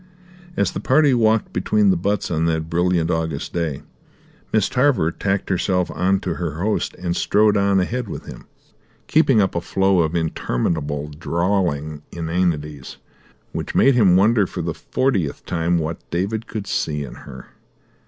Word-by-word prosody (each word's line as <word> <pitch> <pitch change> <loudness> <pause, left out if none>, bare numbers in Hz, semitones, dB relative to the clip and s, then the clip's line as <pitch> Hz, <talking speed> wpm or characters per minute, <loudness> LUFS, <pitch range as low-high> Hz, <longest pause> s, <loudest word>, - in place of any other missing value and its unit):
As - - +1
the - - -4
party 140 +1 +3
walked 110 -2 +2
between 100 +2 +2
the - - +2
butts 100 +3 -1
on 80 0 +1
that 80 0 -1
brilliant 85 0 +1
August 80 -3 -2
day, 80 -5 -2 0.7
Miss 110 -3 +2
Tarver 125 - +2
tacked 95 +2 -2
herself 90 0 0
on 95 +3 +1
to 85 -3 -3
her 85 -3 -4
host 105 +4 -1
and 85 -1 -3
strode 105 +2 +3
on 100 -1 +3
ahead 115 +6 -2
with - - -7
him, - - -11 0.6
keeping 140 -7 +3
up 95 -2 +2
a 85 - -1
flow 95 +1 +2
of 80 0 +1
interminable, 75 -2 -2
drawling 80 -2 -1
inanities, 80 -4 -2 0.5
which - - -5
made 135 - +5
him 100 -8 +5
wonder 105 +1 +4
for 90 - -5
the 85 0 -2
fortieth 100 - -1
time 85 0 0
what 80 0 -4
David 100 +7 -2
could 110 -4 -5
see 75 -6 -2
in 60 - -8
her. - - -11
90 Hz, 160 wpm, -21 LUFS, 80-100 Hz, 0.7 s, made